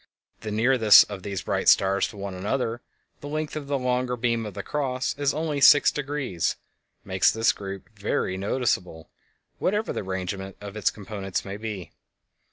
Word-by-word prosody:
The 110 - -6
nearness 110 0 +6
of 100 -2 -8
these 100 -2 -4
bright - - +1
stars 95 0 +4
to - - -12
one 100 -1 -5
another—the 115 +7 -5
length 155 +1 -3
of 150 -2 -5
the 140 0 0
longer 125 -1 -1
beam 115 -2 0
of 100 - -9
the - - -5
"Cross" 130 -3 -2
is 140 -1 +2
only 155 -1 -2
sixdegrees—makes 135 - +2
this 115 0 +3
group 95 -1 -8
very 100 -2 -1
noticeable, 95 -5 -2 0.5
whatever 210 +3 0
the - - -3
arrangement 95 0 -5
of 100 0 -9
its 110 - +2
components 100 -2 -5
may 100 0 -5
be. 105 -4 -6
110 Hz, 155 wpm, -25 LUFS, 95-135 Hz, 0.5 s, nearness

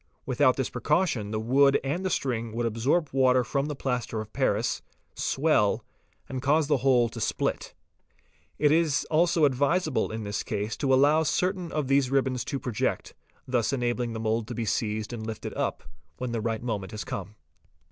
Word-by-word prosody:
Without 130 0 +3
this 130 - -2
precaution 150 - 0
the 110 0 -2
wood 135 +5 +4
and 150 +7 -2
the 190 - 0
string 115 -8 -2
would 120 +1 -1
absorb 130 +8 +1
water 130 -1 +4
from 140 +3 -1
the 150 - -4
plaster 125 -4 -2
of 110 0 -7
paris, 115 -4 0 0.3
swell, - - +1 0.4
and 130 -1 -4
cause 150 +3 +3
the 145 0 +2
whole 125 -2 +3
to 115 0 -8
split. - - -2 0.8
It 150 -1 +3
is 160 -3 +2
also 165 0 +4
advisable, 145 +6 +1
in 110 0 -4
this 100 0 -3
case, 105 +1 -3
to 135 -2 0
allow 145 +4 +5
certain 180 +3 0
of 150 -3 -1
these 135 -1 +3
ribbons 130 -2 +1
to 140 - -3
project, 120 -5 -2 0.3
thus 125 -2 +1
enabling 120 -2 -1
the 110 - -4
mould 110 0 -1
"to 120 - -5
be 115 - -2
seized 110 +1 -2
and 115 -2 -5
lifted 110 -1 -5
up, - - -2 0.3
when 125 -1 -3
the 115 -2 -2
right 115 0 -2
moment 105 -6 -3
has 105 - -4
come. 100 +2 -6
125 Hz, 180 wpm, -27 LUFS, 115-140 Hz, 0.8 s, allow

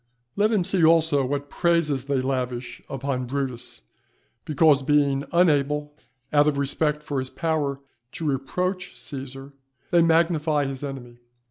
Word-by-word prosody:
Let 210 +2 +2
him 210 -5 +2
see 175 0 +1
also 160 -3 +4
what 140 +2 -3
praises 160 -6 +1
they 140 -2 0
lavish 125 -2 -3
upon 135 -1 -3
Brutus, 130 - -4 0.6
because 150 -1 +4
being 140 0 +2
unable, 150 -4 +2 0.4
out 145 0 +5
of 150 -2 +1
respect 150 +2 0
for 145 -2 -2
his 130 0 -4
power, 150 -4 -1 0.3
to 165 - -5
reproach 180 +7 -2
Cæsar, 135 0 -7 0.4
they 175 -1 +5
magnify 160 -3 +2
his 135 0 -5
enemy. 125 -4 -7
145 Hz, 135 wpm, -24 LUFS, 135-160 Hz, 0.6 s, out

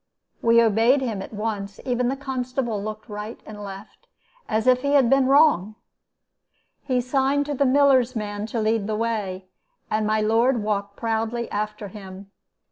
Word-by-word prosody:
"We 230 0 +5
obeyed 230 +5 +4
him 225 -7 -3
at - - -8
once; 205 -2 -4
and - - -14
even 250 -1 +1
the 265 - 0
constable 255 -5 -3
looked 215 +2 -6
right 210 +1 -7
and 210 -1 -9
left, 195 +1 -10 0.4
as 220 0 0
if 255 0 +4
he 280 +1 0
had 270 -4 +4
been 270 -1 +4
wrong. 270 - +4 1.1
He 255 -3 0
signed 270 +3 +1
to 295 - -3
the 280 0 +2
miller's 260 -2 +4
man 205 -1 -4
to 230 +1 -3
lead 215 -1 0
the 215 - -1
way, 210 -5 -2 0.5
and 215 0 0
my 215 0 +1
lord 225 +2 +2
walked 200 -1 -2
proudly 225 +1 -2
after 210 0 -4
him. 195 -1 -11
225 Hz, 170 wpm, -23 LUFS, 210-255 Hz, 1.1 s, We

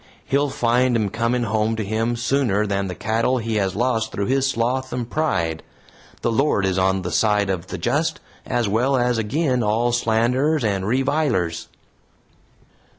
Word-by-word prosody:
He'll 140 +1 +1
find 120 0 +1
'em 105 -3 0
coming 115 +3 0
home 110 0 0
to 110 - -2
him 115 +3 -1
sooner 115 -4 +1
than 100 -1 -1
the 90 - -5
cattle 115 +4 0
he 115 -2 -2
has 95 -2 0
lost 115 0 0
through 100 - -2
his 135 +3 +1
sloth 130 +2 -1
and 125 -2 -3
pride. 90 - -1 0.6
The 115 - +1
Lord 120 -5 +1
is 95 -1 0
on 95 0 +1
the 90 - -4
side 105 -2 +2
of 90 -1 -4
the - - -5
just, - - 0 0.2
as 120 -3 -1
well 125 +7 +1
as 125 -1 +1
agin 125 +3 0
all 115 +3 +1
slanderers 120 +6 +1
and 100 -3 -1
revilers." 130 - 0
115 Hz, 165 wpm, -22 LUFS, 100-130 Hz, 0.6 s, side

